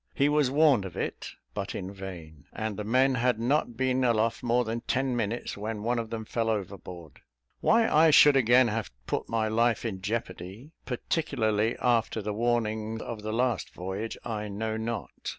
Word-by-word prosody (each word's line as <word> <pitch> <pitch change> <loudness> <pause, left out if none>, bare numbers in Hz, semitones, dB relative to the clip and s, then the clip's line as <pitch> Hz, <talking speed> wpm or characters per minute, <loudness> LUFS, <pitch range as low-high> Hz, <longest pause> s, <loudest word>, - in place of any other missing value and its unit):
He 140 +1 +3
was 150 -3 +3
warned 140 -6 +4
of 95 -3 -8
it, - - -4 0.2
but - - -4
in 95 +2 -5
vain; 85 -6 -9
and 110 0 -3
the 105 - -4
men 130 +5 +3
had 125 -1 +1
not 120 -1 0
been 130 0 +1
aloft 115 -1 +1
more 120 0 +2
than 115 +1 -3
ten 130 -1 0
minutes, 115 0 -2
when 105 0 -4
one 120 +1 +1
of 115 -1 -4
them 110 -1 -5
fell 115 0 -1
overboard. 95 - -5 0.4
Why 230 0 +4
I 160 +2 +5
should 145 -1 +7
again 125 -1 +5
have 110 0 -2 0.2
put - - -3
my 110 -1 0
life 115 +1 +1
in 95 -5 -3
jeopardy, 100 - -5
particularly 120 -5 0
after 115 -2 +1
the 105 0 -3
warning 110 -1 -1
of 115 -1 -6
the 110 +1 -4
last 120 -1 0
voyage, 95 +5 -4
I 105 -3 -3
know 110 +2 -3
not. 110 +1 -4
115 Hz, 180 wpm, -28 LUFS, 105-125 Hz, 0.4 s, should